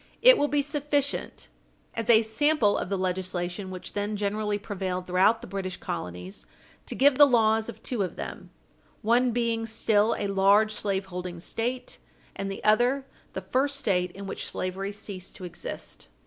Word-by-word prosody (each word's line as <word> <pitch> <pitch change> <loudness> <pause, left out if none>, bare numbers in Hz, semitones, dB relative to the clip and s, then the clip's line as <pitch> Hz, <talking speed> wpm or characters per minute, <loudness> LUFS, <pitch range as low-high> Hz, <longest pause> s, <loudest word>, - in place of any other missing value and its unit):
It - - +10
will 290 - +1
be 290 -1 +1
sufficient, 290 -1 -2 0.5
as 230 0 -3
a 225 -1 +7
sample 225 0 +3
of - - -2
the 200 - 0
legislation 185 0 -2
which 185 -1 -8
then 205 +1 -2
generally 210 0 -1
prevailed 190 -3 -4
throughout 190 +5 +3
the - - -9
British 185 -1 -4
colonies, 90 +2 -6 0.4
to - - -3
give 280 0 +4
the 290 - +10
laws 225 -3 +3
of 220 -1 -10
two 245 -5 -1
of 185 -3 -2
them, 65 -2 -7 0.5
one 240 +3 +3
being 230 -1 0
still 220 0 +2
a 205 - -2
large 200 +2 +4
slaveholding 190 -4 -3
State 240 +7 -4 0.4
and 195 - -3
the 195 - -6
other 245 +6 +3 0.3
the - - -4
first 280 +2 0
State 180 -9 +1
in 200 0 -8
which - - -4
slavery 190 +2 -3
ceased 200 -2 -6
to - - -10
exist. 175 - -7
205 Hz, 165 wpm, -27 LUFS, 185-235 Hz, 0.5 s, It